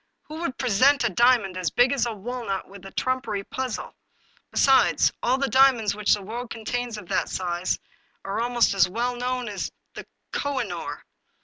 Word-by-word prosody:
Who 310 +1 -8
would 270 -7 -3
present 260 +4 +3
a 235 - +1
diamond 230 -3 +3
as 180 -3 0
big 245 +2 +3
as 255 -3 +1
a - - -2
walnut 215 -2 -4
with 195 -1 -13
a - - -11
trumpery 255 -6 -2
puzzle? 255 +2 -4 0.6
Besides, 270 -1 +4
all 255 +2 +2
the 275 0 0
diamonds 260 -6 +4
which 210 0 +2
the 205 - -9
world 235 +4 -6
contains 235 +1 -4
of 205 -4 -10
that - - 0
size 180 0 -1 0.5
are 195 +3 -2
almost 240 -2 +2
as 185 -2 +4
well 240 +5 -1
known 250 0 -2
as 205 -2 -4 0.2
the - - -9 0.2
Koh 285 -2 -1
i - - 0
noor. - - -6
240 Hz, 185 wpm, -25 LUFS, 200-255 Hz, 0.6 s, Besides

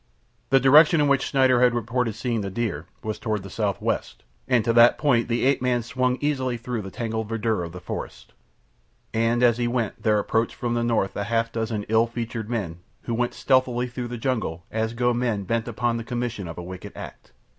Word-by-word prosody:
The 135 - +5
direction 150 +5 +6
in 145 - +3
which 140 -1 +3
Schneider 130 -3 +3
had 125 -1 +4
reported 120 -1 -1
seeing 115 -1 -2
the 100 - -3
deer 95 -7 -3 0.2
was 110 -1 -4
toward 110 -4 -2
the 95 - -9
south 105 -4 -1
west, - - -3 0.2
and 125 -4 +2
to 115 - +2
that 120 +1 +6
point 125 -6 +2
the 120 +1 0
ape 135 -1 +3
man 125 -2 +1
swung 125 +2 0
easily 130 -4 0
through 120 -1 -4
the 95 - -7
tangled 110 +1 -3
verdure 110 -4 -1
of 85 - -6
the 90 - -8
forest. 90 - -7 0.8
And 115 +2 +2
as 120 -1 +4
he 120 - +1
went 120 -3 -2
there 105 -1 +3
approached 115 +2 0
from 120 -1 -2
the 120 0 0
north 115 -5 0
a 100 - -2
half 115 +1 0
dozen 110 -2 -2
ill 110 +1 +3
featured 115 -2 -5
men 95 -8 -3 0.2
who 120 - -3
went 120 +1 -1
stealthily 130 -2 +2
through 125 0 -5
the 120 0 -5
jungle 110 -9 -2
as 110 +1 -1
go 120 0 +2
men 120 -4 -1
bent 115 +4 -1
upon 120 +1 -1
the 115 - -4
commission 120 -5 -3
of 80 - -8
a 90 - -5
wicked 95 +3 -8
act. - - -10
115 Hz, 215 wpm, -24 LUFS, 110-125 Hz, 0.8 s, direction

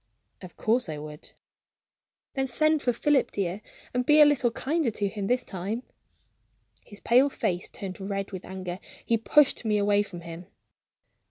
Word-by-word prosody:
"Of 185 -2 -12
course 230 -3 +1
I 155 - -4
would." 150 0 -10 1.0
"Then 270 -1 -1
send 310 +3 +2
for 245 - +2
Philip, 280 +4 +2
dear, 195 0 -3 0.3
and 250 0 +1
be 300 +4 +5
a 300 - +10
little 285 -4 +3
kinder 290 +4 -1
to 205 -2 -2
him, 200 -1 -4
this 250 +2 +1
time." 200 +6 -4 1.0
His 205 -2 -12
pale 255 +4 +4
face 180 -9 -2
turned 190 -1 -7
red 195 0 -3
with 185 -2 -7
anger; 185 -1 -6 0.3
he 230 - +2
pushed 280 +4 +3
me 215 -2 +1
away 205 0 +3
from 180 -4 -7
him. 170 +1 -9
210 Hz, 165 wpm, -27 LUFS, 185-255 Hz, 1.0 s, a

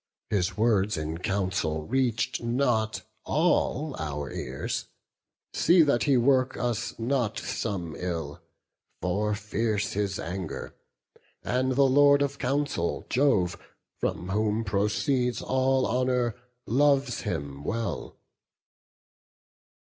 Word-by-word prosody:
His 100 0 0
words 105 -3 +2
in 80 +1 -3
council 95 -5 -1
reach'd 125 0 0
not 115 -3 0 0.2
all 155 -2 +1
our 75 -3 -4
ears: - - -4 0.7
See 175 -1 +5
that 140 -5 +2
he 140 -3 +4
work 130 +1 +3
us 120 -2 -2
not 120 -2 0
some 90 -8 -3
ill; 80 -5 -4 0.6
for 105 +4 0
fierce 110 +1 -1
His 100 -1 -1
anger; 90 0 -5 0.7
and 130 +1 +1
the 140 +2 +4
Lord 140 +1 +5
of 140 0 -3
counsel, 135 -9 -1
Jove, 120 -10 +3 0.4
From 90 - -2
whom 105 +2 +1
proceeds 110 +5 0
all 130 0 +1
honour, 125 -2 +1 0.3
loves 140 0 +2
him 70 0 -4
well." 115 +7 -3
115 Hz, 105 wpm, -27 LUFS, 95-130 Hz, 0.7 s, See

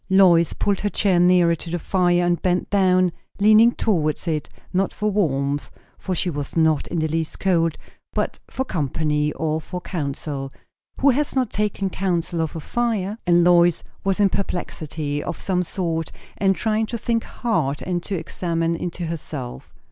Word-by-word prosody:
Lois 180 -3 +5
pulled 200 -2 0
her 205 - 0
chair 195 -3 +2
nearer 175 -1 +5
to 165 +1 -6
the 175 - -1
fire, 175 0 +2
and 175 -1 +1
bent 180 -1 0
down, 185 -2 +4 0.3
leaning 215 +3 +6
towards 165 -9 0
it; 155 -2 -1 0.2
not 190 +1 +1
for 210 0 -1
warmth, 145 -7 0 0.3
for 185 - -2
she 180 - -1
was 145 -2 -4
not 160 -3 +3
in 175 - -3
the 160 -1 +1
least 160 0 -2
cold; 165 -4 +2 0.4
but - - -2
for 265 - -2
company, 150 - 0
or 160 0 -1
for 180 +3 -6
counsel. 140 -5 -4 0.5
Who 280 +1 +6
has 285 +3 -1
not 255 -4 +1
taken 205 -2 -1
counsel 175 -3 -1
of 160 0 -3
a - - -3
fire? 220 +1 -1
And 175 0 +5
Lois 175 -1 +4 0.2
was 195 0 0
in 200 -1 +5
perplexity 155 -6 -3
of 170 - -5
some 180 -2 0
sort, 165 -3 -2 0.2
and 195 -1 +2
trying 220 +1 0
to 235 - -3
think 230 0 0
hard 155 - -1
and 175 -1 -1
to 195 - -4
examine 165 -1 -1
into 175 +1 -4
herself. 145 - -6
175 Hz, 170 wpm, -22 LUFS, 160-195 Hz, 0.5 s, leaning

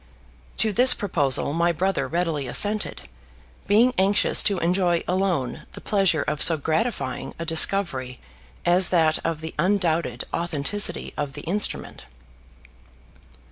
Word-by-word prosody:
To 220 -1 +1
this 250 +5 +5
proposal 145 -8 0
my 170 +1 +1
brother 185 +3 -2
readily 165 -5 -2
assented, 210 - +2 0.7
being 230 +5 +3
anxious 195 +2 +3
to 200 -2 +1
enjoy 175 0 0
alone 180 -9 -2
the - - -8
pleasure 195 -7 +1
of 150 0 -4
so 165 - +7
gratifying 155 - -3
a 165 - -6
discovery 160 -6 -1 0.5
as 175 +1 +4
that 160 -3 +2
of 160 -2 -3
the 160 0 -7
undoubted 175 -2 -1
authenticity 170 +4 -1
of 145 -2 -4
the 145 - -7
instrument. 195 +7 -4
170 Hz, 125 wpm, -23 LUFS, 155-195 Hz, 0.7 s, so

